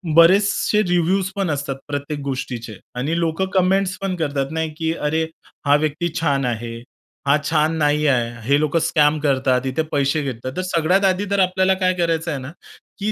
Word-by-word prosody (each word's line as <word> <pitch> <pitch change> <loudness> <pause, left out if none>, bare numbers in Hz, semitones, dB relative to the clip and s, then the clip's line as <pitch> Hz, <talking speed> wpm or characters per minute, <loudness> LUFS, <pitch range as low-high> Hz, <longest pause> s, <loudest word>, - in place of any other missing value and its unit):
बरेचसे 200 +5 +4
रिव्ह्यूज 180 +2 +1
पण 195 -3 -1
असतात 140 -1 -3
प्रत्येक 145 +1 -4
गोष्टीचे 120 -5 -5 0.2
आणि 150 +7 -1
लोकं 165 +2 0
कमेंट्स 190 0 +2
पण 195 -1 -1
करतात 145 -4 -2
नाही, 160 0 -2
की 160 0 -1
अरे 160 0 -1 0.4
हा 145 0 +5
व्यक्ती 155 +3 0
छान 140 -4 +1
आहे, 115 -1 -3 0.5
हा 140 +2 +5
छान 155 0 +2
नाही 150 0 +2
आहे. 120 -4 +2 0.2
हे 140 +1 +4
लोकं 155 +2 +1
स्कॅम 155 -1 +2
करतात. 130 -3 +1
इथे 130 +4 0
पैसे 140 +2 +1
घेतात. 130 -1 -4
तर - - 0
सगळ्यात 180 +5 +3
आधी 190 +1 +1
तर 200 - +2
आपल्याला 185 0 +3
काय 185 0 +3
करायचं 165 -2 -1
आहे 145 - -3
ना, 130 +3 -7 0.5
की 210 +2 -1
155 Hz, 180 wpm, -21 LUFS, 140-180 Hz, 0.5 s, हा